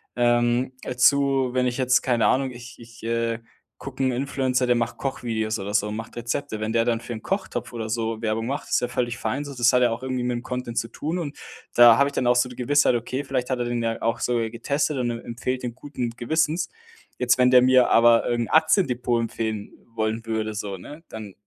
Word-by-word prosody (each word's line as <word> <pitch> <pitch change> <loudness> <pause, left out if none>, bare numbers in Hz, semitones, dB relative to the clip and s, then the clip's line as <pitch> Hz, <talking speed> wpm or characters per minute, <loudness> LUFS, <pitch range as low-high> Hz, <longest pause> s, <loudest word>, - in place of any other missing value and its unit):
Ähm, 120 +1 +2
dazu, 135 +1 +2
wenn 125 0 +2
ich 125 - -2
jetzt 130 -1 +3
keine 120 -4 +1
Ahnung, 130 0 +1
ich 120 0 -11
ich, 115 -1 -14
äh, 115 0 -1 0.4
gucke 135 0 -5
'n 130 - +2
Influencer, 130 0 0
der 125 - +4
macht 115 -1 -2
Kochvideos 110 -5 -2
oder 100 +1 -5
so, 105 0 +1
macht 110 +2 -7
Rezepte. 115 -1 -3
Wenn 110 +1 -2
der 115 0 +3
dann 115 -1 +1
für 120 - -6
'n 110 - -7
Kochtopf 190 -7 -3
oder 115 -2 -4
so 115 0 -2
Werbung 115 +1 -1
macht, 140 +3 -4
ist - - +2
ja 125 - 0
völlig 120 -1 -2
fein 135 +7 -3
so. 140 - -7
Das 120 0 +4
hat 125 0 +3
ja 120 - +3
auch 115 +2 -4
irgendwie 130 -1 -2
mit 125 0 -1
dem 120 - -5
Content 125 -2 -5
zu 115 - 0
tun 165 +4 -3
und 145 -4 -5 0.4
da 120 -1 +8
habe 140 0 +3
ich - - -14
dann 125 -3 0
auch 125 - +4
so 125 +1 +2
die 125 - -11
Gewissheit: 130 0 +3
„Okay, 130 +4 -3
vielleicht 130 -2 -2
hat 130 -1 -1
er 120 - -1
den 120 -1 -2
ja 115 0 -2
auch 115 +1 0
sogar 115 -2 0
getestet 140 +5 -1
und 120 -2 0
er 115 - -6
empfiehlt 125 +2 -3
den 120 -2 -4
guten 130 -3 -4
Gewissens.“ 160 +7 0 0.5
Jetzt, 125 0 +2
wenn 125 0 +5
der 125 -1 +8
mir 130 0 +5
aber 115 0 +5
irgend 120 -1 -1
'n - - -8
Aktiendepot 125 - +2
empfehlen 110 -2 -4 0.2
wollen 110 +1 -2
würde 110 -1 -2
so, 105 -2 -4
ne, 150 - -11
dann 105 -3 -8
120 Hz, 230 wpm, -24 LUFS, 115-130 Hz, 0.5 s, da